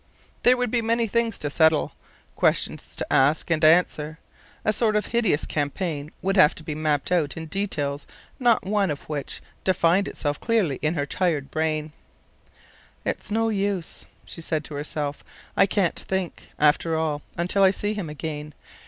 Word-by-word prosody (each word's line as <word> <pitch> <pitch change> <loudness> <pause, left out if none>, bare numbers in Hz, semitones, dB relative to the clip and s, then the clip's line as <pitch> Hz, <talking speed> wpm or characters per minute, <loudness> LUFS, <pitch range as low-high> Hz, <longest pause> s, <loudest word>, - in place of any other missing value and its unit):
There 250 +1 +5
would 245 -3 -1
be 240 - +2
many 230 +1 +1
things 230 0 0
to 145 - -3
settle, 160 -1 +3 0.4
questions - - +1
to - - -3
ask 145 +5 +3
and 160 -2 +1
answer; 155 -1 +3 0.5
a 215 - +3
sort 215 0 +2
of 210 - +1
hideous 225 -10 +1
campaign 150 0 -2
would 195 +2 +1
have 170 -5 +6
to 155 - -9
be 155 - -4
mapped 150 0 0
out 165 -5 +1
in 160 - -5
details 150 -6 -2 0.3
not 240 -3 +3
one 200 -1 +1
of 145 -2 -5
which 145 -3 -4 0.2
defined 185 +1 +3
itself 145 -1 -3
clearly 210 - +1
in 155 +3 0
her 145 -2 0
tired 150 -3 -1
brain. 155 -1 -1 1.1
"It's - - -2
no 225 +1 +1
use," 200 -4 -2 0.2
she 165 - -8
said 155 -1 -1
to 150 - -9
herself. 145 0 -4 0.3
"I 195 - +5
can't 190 -3 +1
think, 190 -2 -3
after 150 +2 +3
all, 155 -2 -1 0.2
until 180 +4 +1
I 190 - +7
see 205 +2 -1
him 200 -7 -4
again. 150 0 -6
165 Hz, 170 wpm, -25 LUFS, 150-200 Hz, 1.1 s, I